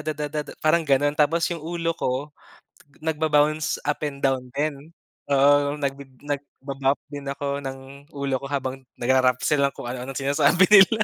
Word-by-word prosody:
da 150 Hz, -1 st, -3 dB
da 150 Hz, +1 st, -3 dB
da -, -, -9 dB
parang 160 Hz, +2 st, +3 dB
ganon, 145 Hz, +1 st, +3 dB
tapos 165 Hz, +3 st, +3 dB
yung 170 Hz, -, -3 dB
ulo 165 Hz, 0 st, -2 dB
ko 130 Hz, +4 st, -2 dB, 0.7 s
nagba-bounce 155 Hz, -1 st, +1 dB
up 145 Hz, -, 0 dB
and 140 Hz, -1 st, -5 dB
down 135 Hz, -2 st, +2 dB
din. 150 Hz, +1 st, -3 dB, 0.4 s
Oo, 145 Hz, +1 st, +4 dB
nag 140 Hz, -2 st, -1 dB, 0.3 s
nagba-bop 140 Hz, -1 st, -2 dB
din 145 Hz, -1 st, -7 dB
ako 140 Hz, 0 st, -3 dB
ng 135 Hz, -1 st, -6 dB, 0.4 s
ulo 140 Hz, -1 st, -1 dB
ko -, -, -7 dB
habang 135 Hz, -1 st, -3 dB, 0.2 s
nagra-rap 130 Hz, 0 st, +3 dB
sila 140 Hz, -2 st, +3 dB
kung -, -, -8 dB
ano-anong 130 Hz, +2 st, -6 dB
sinasabi 140 Hz, +5 st, +3 dB
nila. 210 Hz, +2 st, +7 dB
145 Hz, 160 wpm, -24 LUFS, 135-155 Hz, 0.7 s, nila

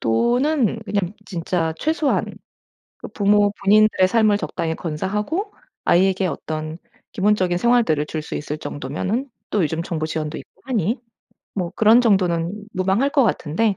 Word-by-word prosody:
또는 240 Hz, -, +1 dB
그냥 200 Hz, -3 st, -1 dB
진짜 170 Hz, -2 st, -1 dB
최소한 315 Hz, -1 st, +1 dB, 0.7 s
그 -, -, -8 dB
부모 205 Hz, 0 st, +3 dB
본인들의 210 Hz, -2 st, +5 dB
삶을 215 Hz, -1 st, +3 dB
적당히 160 Hz, -1 st, -3 dB
건사하고 210 Hz, -, -3 dB, 0.3 s
아이에게 190 Hz, +1 st, +3 dB
어떤 155 Hz, 0 st, -4 dB, 0.3 s
기본적인 190 Hz, -4 st, +1 dB
생활들을 225 Hz, -10 st, +2 dB
줄 155 Hz, 0 st, -4 dB
수 -, -, -7 dB
있을 150 Hz, +1 st, -4 dB
정도면은 185 Hz, -, -3 dB, 0.2 s
또 205 Hz, -, +1 dB
요즘 160 Hz, +1 st, -1 dB
정부 160 Hz, -2 st, -3 dB
지원도 155 Hz, -1 st, -3 dB
있고 -, -, -16 dB
하니 235 Hz, -, -1 dB, 0.5 s
뭐 180 Hz, -4 st, -2 dB
그런 220 Hz, +2 st, +6 dB
정도는 190 Hz, -2 st, +1 dB
무방할 195 Hz, +9 st, +1 dB
것 280 Hz, -1 st, +4 dB
같은데 195 Hz, +2 st, 0 dB
195 Hz, 315 characters per minute, -21 LUFS, 165-220 Hz, 0.7 s, 그런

